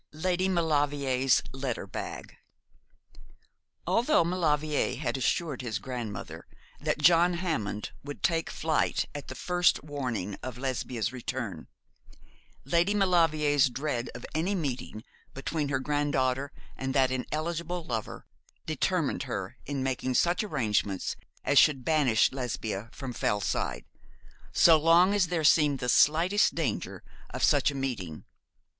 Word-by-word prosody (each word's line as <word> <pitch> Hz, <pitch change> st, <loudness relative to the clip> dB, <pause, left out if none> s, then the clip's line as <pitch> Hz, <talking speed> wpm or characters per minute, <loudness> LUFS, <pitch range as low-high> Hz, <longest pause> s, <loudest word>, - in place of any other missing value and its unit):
LADY 185 Hz, +4 st, 0 dB
MAULEVRIER'S 145 Hz, -6 st, +2 dB
LETTER 130 Hz, -3 st, -4 dB
BAG. -, -, -7 dB, 1.5 s
Although 250 Hz, -, +3 dB
Maulevrier 155 Hz, -4 st, 0 dB
had -, -, -2 dB
assured 140 Hz, +1 st, -1 dB
his 115 Hz, -4 st, -3 dB
grandmother 115 Hz, -2 st, -6 dB, 0.3 s
that -, -, -1 dB
John 170 Hz, +3 st, +5 dB
Hammond 155 Hz, -, -3 dB
would 145 Hz, 0 st, -8 dB
take 165 Hz, -1 st, +1 dB
flight 160 Hz, 0 st, 0 dB
at 145 Hz, -, -7 dB
the 130 Hz, -, -7 dB
first 180 Hz, -1 st, +2 dB
warning 125 Hz, -10 st, -4 dB
of 125 Hz, -1 st, -6 dB
Lesbia's 125 Hz, -3 st, -2 dB
return, 120 Hz, -8 st, -5 dB, 1.0 s
Lady 170 Hz, +8 st, +2 dB
Maulevrier's 155 Hz, -7 st, +3 dB
dread 130 Hz, -2 st, -3 dB
of -, -, -8 dB
any 175 Hz, +6 st, 0 dB
meeting 130 Hz, -, -4 dB, 0.3 s
between 145 Hz, +2 st, -2 dB
her 135 Hz, -, +1 dB
granddaughter 140 Hz, -1 st, 0 dB, 0.2 s
and 130 Hz, +1 st, -4 dB
that 130 Hz, -2 st, +3 dB
ineligible 170 Hz, +6 st, -3 dB
lover 115 Hz, -7 st, -5 dB, 0.4 s
determined -, -, 0 dB
her -, -, -4 dB
in 140 Hz, -2 st, -2 dB
making 130 Hz, -1 st, -1 dB
such 175 Hz, -, +2 dB
arrangements 105 Hz, -, -1 dB, 0.3 s
as 145 Hz, -, +5 dB
should 135 Hz, -4 st, +3 dB
banish 145 Hz, -9 st, +3 dB
Lesbia 115 Hz, -5 st, -4 dB
from 130 Hz, -3 st, -6 dB
Fellside, 105 Hz, -4 st, -1 dB, 0.7 s
so 165 Hz, -2 st, +6 dB
long 170 Hz, +5 st, +5 dB
as 200 Hz, -4 st, +2 dB
there 165 Hz, -2 st, -1 dB
seemed 150 Hz, -2 st, +4 dB
the 125 Hz, -1 st, -4 dB
slightest 170 Hz, -, +4 dB
danger 150 Hz, -10 st, -3 dB, 0.3 s
of -, -, -5 dB
such -, -, +4 dB
a 145 Hz, -, -5 dB
meeting. 115 Hz, -, -4 dB
145 Hz, 125 wpm, -28 LUFS, 125-165 Hz, 1.5 s, so